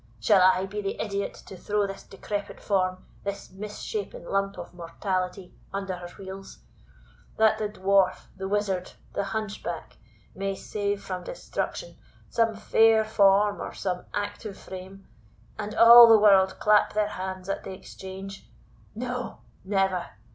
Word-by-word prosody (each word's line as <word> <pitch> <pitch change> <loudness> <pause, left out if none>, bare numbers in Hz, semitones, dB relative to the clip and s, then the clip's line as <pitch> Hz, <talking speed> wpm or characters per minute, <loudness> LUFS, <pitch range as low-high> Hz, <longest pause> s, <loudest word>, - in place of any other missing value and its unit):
Shall 145 +11 +5
I 185 +1 +5
be 205 +2 -5
the 195 -1 -4
idiot 200 -2 -2
to - - -10
throw 205 +3 0
this 195 0 -6
decrepit 205 +1 -6
form, 185 -2 0 0.2
this 200 0 -5
mis 205 +2 -8
shapen 455 +3 -5
lump 195 0 -1
of - - -8
mortality, 180 +2 -3 0.2
under 195 -1 -3
her 175 -1 -8
wheels, 195 0 -9 0.8
that 220 0 +4
the 210 -1 -1
Dwarf, 195 -2 +2
the 190 0 -5
Wizard, 195 -2 -1 0.2
the 200 - -1
Hunchback, 210 0 -5 0.4
may 195 0 -3
save 205 0 -3
from 185 -2 -5
destruction - - -5 0.3
some 225 -1 +2
fair 220 +1 +4
form 205 -1 +3
or - - -6
some 180 -2 -3
active 205 0 -4
frame, 190 +1 -10 0.5
and 210 +1 -4
all 235 +1 +10
the 225 -1 +8
world 195 -3 +5
clap 210 0 +4
their 210 0 +1
hands 185 -1 -5
at 195 - -3
the 195 - -7
exchange? 190 +1 -9 0.5
No, 250 +1 -4 0.2
never! 190 -2 0
195 Hz, 145 wpm, -27 LUFS, 190-210 Hz, 0.8 s, all